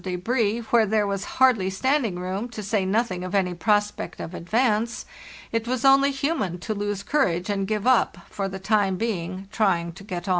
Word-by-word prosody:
débris, 215 +5 -1
where 230 -2 +5
there 215 0 +2
was 200 -1 -2
hardly 245 -8 +4
standing 235 0 0
room, 190 +6 -3
to 220 -2 -7
say 205 0 0
nothing 190 -2 0
of 185 +2 -4
any 185 -2 +1
prospect 210 +3 0
of 170 - -6
advance, 225 +5 0 0.5
it 230 0 -1
was 255 +1 -1
only 275 +1 +6
human 270 - -1
to 200 +5 -4
lose 205 -1 -3
cour 280 +7 +2
age 175 +3 -2
and 195 -1 -1
give 215 0 -2
up, 255 -7 +3
for 195 -1 -3
the 190 - -6
time 195 -1 +1
being, 185 -3 -3
trying 175 -6 +1
to 195 +4 -13
get 180 -3 -6
on. - - -2
205 Hz, 195 wpm, -24 LUFS, 185-230 Hz, 0.5 s, only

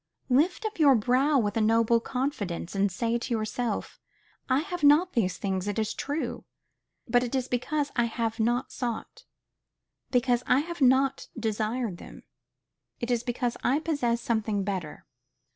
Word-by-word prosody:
Lift 310 - +2
up 435 -4 -4
your 285 -4 +6
brow 255 +6 +3
with 210 -5 0
a 225 - +2
noble 230 +1 +3
confidence, 230 -10 -3
and 200 0 +1
say 230 +5 -1
to 240 - -3
yourself, 220 0 -3 0.5
I 260 +2 +3
have 355 0 -5
not 300 +5 +5
these 190 -7 0
things, 190 -1 -2
it 205 - -2
is 215 -1 0
true; 275 -5 -3 0.6
but 245 +1 +3
it 250 +2 -3
is 260 -1 0
because 280 +4 -1
I 235 - +3
have 230 -1 -2
not 240 +4 0
sought, 240 -4 -5 0.8
because 245 -1 +2
I 270 - +4
have 340 0 -7
not 265 +1 +3
desired 220 -1 -2
them; - - -12 0.8
it 240 +1 -2
is 240 -2 +2
because 245 0 -2
I 265 - +3
possess 285 -7 0
something 220 -4 0
better. 185 -6 -4
240 Hz, 160 wpm, -27 LUFS, 220-270 Hz, 0.8 s, your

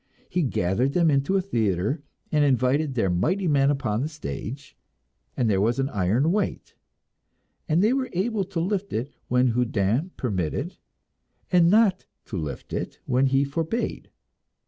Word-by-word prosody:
He 180 - +1
gathered 125 - 0
them 170 -3 +3
into 140 +7 +2
a - - +2
theatre, 110 - 0 0.3
and 150 -1 +3
invited 135 +2 +2
their 100 -7 +1
mighty 175 - +1
men 140 -2 +3
upon 120 -6 0
the 145 - -1
stage, 140 - -7 0.6
and 120 - +2
there 100 -3 +2
was 115 +4 +1
an 135 0 0
iron 110 - +1
weight, 205 +2 -2 1.0
and 165 +4 +3
they 220 +4 +4
were 265 -1 -1
able 200 +3 0
to 185 -2 -4
lift 195 +3 -2
it 120 +6 -3
when 125 0 +3
Houdin 115 - 0
permitted, 95 - -2 0.7
and 175 -2 +5
not 205 -2 +3 0.2
to - - -7
lift 75 -4 -6
it - - -4
when 130 +2 +2
he 135 +1 +3
forbade. 165 - -3
140 Hz, 155 wpm, -25 LUFS, 115-175 Hz, 1.0 s, and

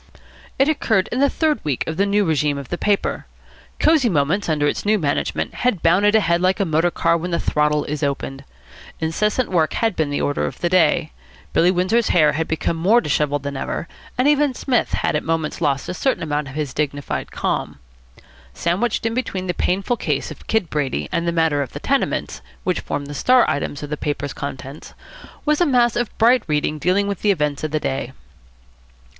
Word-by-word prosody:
It 270 - +3
occurred 220 -11 +1
in 245 - -1
the 280 0 +4
third 310 0 0
week 145 -5 -1
of 160 - -3
the 200 +4 +1
new 205 0 +2
régime 150 -3 +1
of 140 -2 -7
the 175 - -2
paper. 205 -1 0 0.5
Cosy 310 -6 +4
Moments, 170 +4 +1
under 150 -2 +1
its 145 - -1
new 215 +1 +3
management, 145 -7 -1
had 245 -9 0
bounded 200 +6 +4
ahead 170 -5 +3
like 185 +1 +2
a 200 - +2
motor 165 +1 +2
car 170 - +1
when 175 +2 -4
the 170 -1 0
throttle 150 0 +1
is 150 +1 -4
opened. 140 -1 -3 0.6
Incessant 210 +10 0
work 160 -4 +2
had 225 -4 0
been 155 -2 0
the 145 - -1
order 145 - 0
of - - -7
the 175 - -1
day. 165 -3 +3 0.4
Billy 175 - +4
Windsor's 190 +6 +2
hair 155 -4 +4
had 160 +2 -2
become 160 +1 -1
more 200 +9 +4
dishevelled 145 - 0
than 140 0 -4
ever, 150 - -4 0.3
and 255 +3 +3
even 295 -2 +3
Psmith 250 -2 0
had - - 0
at 150 - +1
moments 165 0 -2
lost 140 -3 0
a - - -3
certain 265 +4 0
amount 150 -2 -2
of 135 - -9
his 150 -4 -3
dignified 145 -1 -3
calm. - - -2 0.8
Sandwiched 200 +8 0
in 225 - 0
between 225 -7 -3
the 180 - -1
painful 195 +8 0
case - - -2
of - - -12
Kid 220 -7 0
Brady 130 - -2
and 170 0 -1
the - - +2
matter 160 -3 +1
of 135 - -5
the - - -5
tenements, 275 0 -1 0.2
which 185 - 0
formed 145 - -4
the 145 - -7
star 250 - +4
items 145 0 -2
of 145 - -7
the 150 - -2
paper's 145 -1 -3
contents, 140 +1 -7 0.5
was 300 +2 +2
a - - +5
mass 240 -3 +3
of 240 -1 0
bright 240 +3 +5
reading 150 0 0
dealing 185 +5 +2
with 200 -3 -3
the 210 - +2
events 150 -7 0
of 155 - -1
the 155 +1 -1
day. 135 -2 -3
170 Hz, 205 wpm, -21 LUFS, 150-210 Hz, 0.8 s, a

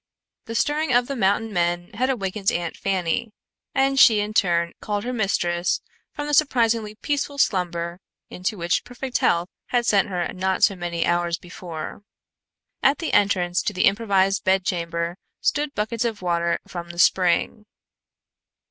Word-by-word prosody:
The 230 - -6
stirring 295 +3 +1
of 245 0 +4
the 275 - -4
mountain 215 0 +1
men 175 0 0
had 255 +5 0
awakened 195 -5 -1
Aunt 170 -1 -3
Fanny, 190 +3 -1 0.4
and 270 0 +2
she 220 -4 +7
in 210 +1 -2
turn 170 -5 +2
called 205 -1 -2
her 250 - -3
mistress 175 -6 0 0.3
from 290 -1 -5
the 295 - -3
surprisingly 230 -7 +2
peaceful 285 +3 -2
slumber 175 -6 0 0.3
into 185 +4 -3
which 170 -1 0
perfect 250 +1 -4
health 170 +1 +2 0.2
had 245 -1 +1
sent 200 -3 +3
her 180 -2 -1
not 190 0 -1
so 200 - +5
many 175 -2 -2
hours 175 0 +1
before. 170 -1 -8 0.8
At 275 +2 +4
the 330 - -4
entrance 180 -3 +2
to 210 - -2
the 185 - +2
improvised 195 -2 +2
bedchamber 175 -2 0 0.2
stood 295 -1 0
buckets 220 +2 -1
of 225 -5 -3
water 170 -1 +1
from 170 -1 -7
the 170 - -9
spring. 185 +4 +2
195 Hz, 155 wpm, -23 LUFS, 175-230 Hz, 0.8 s, she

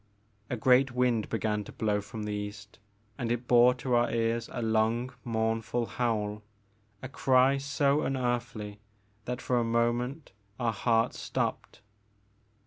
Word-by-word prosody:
A 125 - -2
great 130 +2 +4
wind 125 -3 +1
began 105 -2 -1
to - - -10
blow 105 -2 0
from 105 +1 -7
the 105 0 -3
east 105 0 -7 0.4
and 120 -1 -1
it 120 0 -2
bore 125 +1 +6
to 125 0 -3
our 120 0 +3
ears 115 0 0
a - - -4
long 115 +3 +1
mournful 115 +1 -1
howl, 105 -4 -2 0.3
— 105 0 -39
a - - -3
cry 130 +1 +3
so 140 +1 +1
unearthly 120 -5 -2 0.5
that 125 +1 -4
for 125 -1 +1
a - - +1
moment 120 +5 -1 0.3
our 115 -2 0
hearts 115 +1 +1
stopped. - - -3
120 Hz, 145 wpm, -29 LUFS, 110-125 Hz, 0.5 s, bore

